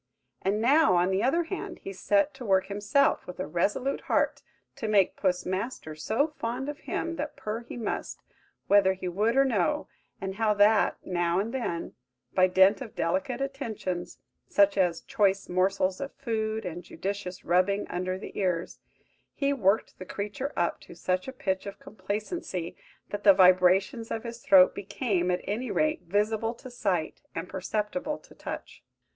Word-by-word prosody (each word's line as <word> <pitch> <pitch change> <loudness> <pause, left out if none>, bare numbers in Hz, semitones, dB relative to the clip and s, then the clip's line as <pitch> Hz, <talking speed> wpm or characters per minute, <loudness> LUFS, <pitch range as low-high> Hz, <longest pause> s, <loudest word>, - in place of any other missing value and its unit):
And 200 +2 0
now, 270 - +5
on 175 +2 +3
the 190 +1 +1
other 330 +9 +2
hand, 375 +3 -5
he 195 - -5
set 300 +9 +2
to 265 -1 -9
work 190 -4 +3
himself, 205 +8 +1
with 180 - -8
a - - -1
resolute 205 - 0
heart, - - +1 0.4
to 220 - -3
make 205 -3 +3
Puss 180 -2 0
Master 185 -3 -3
so 220 - 0
fond 245 +5 -2
of 295 - -6
him 335 0 -3
that 300 0 -4
purr 215 +1 -4
he - - -8
must, 230 - -4 0.4
whether 195 -2 +5
he 185 -1 -6
would 210 +7 +1
or 275 - +6
no; 210 -10 +1 0.3
and 190 0 -5
how 220 -2 +2
that, 205 +1 +4
now 175 -1 0
and 215 +5 -1
then, 200 -10 -3 0.4
by 185 0 +5
dint 190 +5 +5
of 235 -5 -8
delicate 275 -3 -1
attentions, 225 -10 -4 0.3
such 200 0 +4
as 180 -4 +1
choice 200 -1 +1
morsels 185 +1 +1
of 275 - -4
food 220 -4 -2
and 175 0 -5
judicious 185 +1 -5
rubbing 185 +4 +2
under 185 +1 -2
the 190 - -9
ears, 180 -3 -1 0.6
he 280 0 +1
worked 210 -4 +1
the 185 - -7
creature 210 +9 -4
up 170 - 0
to - - -13
such 185 +3 -1
a - - -3
pitch 200 -8 -2
of 200 - -7
complacency, 200 - -4 0.3
that 205 0 -5
the 200 -2 +8
vibrations 185 +5 +4
of 225 - -3
his 235 -1 -7
throat 190 -5 +6
became, 200 -3 -1
at 180 0 0
any 235 +5 -3
rate, 310 0 +1
visible 215 +5 0
to 255 +2 -11
sight, 185 -9 -1
and 165 +2 -4
perceptible 215 +11 -2
to - - -18
touch. - - -8
205 Hz, 170 wpm, -28 LUFS, 185-240 Hz, 0.6 s, the